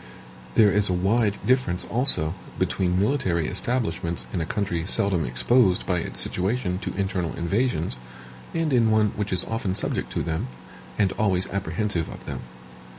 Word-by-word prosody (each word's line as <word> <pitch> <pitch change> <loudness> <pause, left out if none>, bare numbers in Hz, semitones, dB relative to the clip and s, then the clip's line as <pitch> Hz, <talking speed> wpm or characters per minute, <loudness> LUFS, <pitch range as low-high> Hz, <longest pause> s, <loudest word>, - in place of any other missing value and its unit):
There 105 -2 +6
is 105 0 +3
a - - +1
wide 100 +3 +1
difference, 125 -9 +2
also, 115 - +3 0.2
between 90 -1 0
military 95 - +1
establishments 85 - +1
in 85 - -1
a 80 - -3
country 95 -5 -2
seldom 100 -7 +2
exposed 90 - +2
by 90 -2 0
its - - -3
situation 95 -1 0
to - - -5
internal 95 -3 -2
invasions, 85 - 0 0.5
and 165 -3 -1
in 115 -3 +4
one 110 -1 +3
which 105 0 -4
is 90 -1 +1
often 105 -4 -2
subject 105 - -2
to - - -1
them, 80 -4 -2 0.5
and 100 -2 +2
always 95 -4 +1
apprehensive 100 -2 -1
of - - -10
them. - - -5
95 Hz, 155 wpm, -24 LUFS, 85-110 Hz, 0.5 s, There